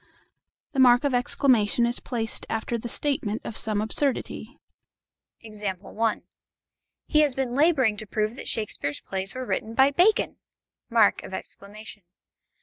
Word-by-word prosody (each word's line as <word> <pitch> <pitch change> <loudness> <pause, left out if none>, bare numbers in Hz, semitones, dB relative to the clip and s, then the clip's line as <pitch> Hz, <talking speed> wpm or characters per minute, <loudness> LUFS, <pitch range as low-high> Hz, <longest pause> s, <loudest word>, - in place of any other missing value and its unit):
The 275 - -3
mark 245 0 +6
of 285 -2 0
exclamation 245 -2 +2
is 240 +1 -1
placed 225 -3 -3
after 225 +1 -2
the 235 +1 -4
statement 230 -6 -1
of 220 - -5
some 215 -2 +1
absurdity. 260 +5 -2 0.8
He 215 - -5
has 295 -4 +3
been 260 -2 -2
labouring 270 -7 +3
to 215 0 -7
prove 215 +2 -1
that - - -8
Shakespeare's 195 -9 -3
plays 190 +2 -5
were 255 0 -4
written 225 -2 -3
by 270 +2 +5
Bacon! 360 +9 +2
235 Hz, 120 wpm, -25 LUFS, 215-265 Hz, 0.8 s, mark